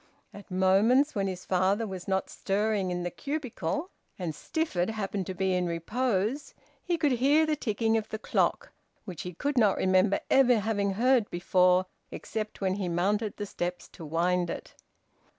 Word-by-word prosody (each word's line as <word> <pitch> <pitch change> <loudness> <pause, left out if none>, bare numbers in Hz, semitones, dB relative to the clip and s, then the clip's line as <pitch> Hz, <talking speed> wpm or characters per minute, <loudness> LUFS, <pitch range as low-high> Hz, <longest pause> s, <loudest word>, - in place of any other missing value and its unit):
At 205 - -12
moments 200 +10 +3
when 195 -1 -1
his 185 -1 -5
father 190 +4 +1
was 190 -3 -7
not 190 -1 0
stirring 205 -1 -1
in 180 0 -2
the 175 - -3
cubicle, 280 - -4 0.3
and 175 -4 -3
Stifford 190 - -2
happened 200 -3 -3
to 190 - -4
be 190 +1 0
in 180 -1 0
repose, 215 - -1 0.3
he 350 -1 0
could 300 -3 +2
hear 280 +6 +4
the 310 -1 +1
ticking 225 -4 0
of 220 0 -4
the 220 - -4
clock, 220 - 0 0.3
which 180 -6 -6
he 180 -1 -7
could 285 - 0
not 210 -4 +4
remember 185 +2 +3
ever 250 -3 +5
having 200 -2 0
heard 240 +1 +3
before, 180 +1 +3 0.2
except 215 -2 -5
when 190 -1 +1
he 190 -3 -2
mounted 205 +5 0
the 205 - -3
steps 175 -2 -4
to 170 - -12
wind 175 +3 0
it. - - -6
200 Hz, 170 wpm, -28 LUFS, 180-230 Hz, 0.3 s, ever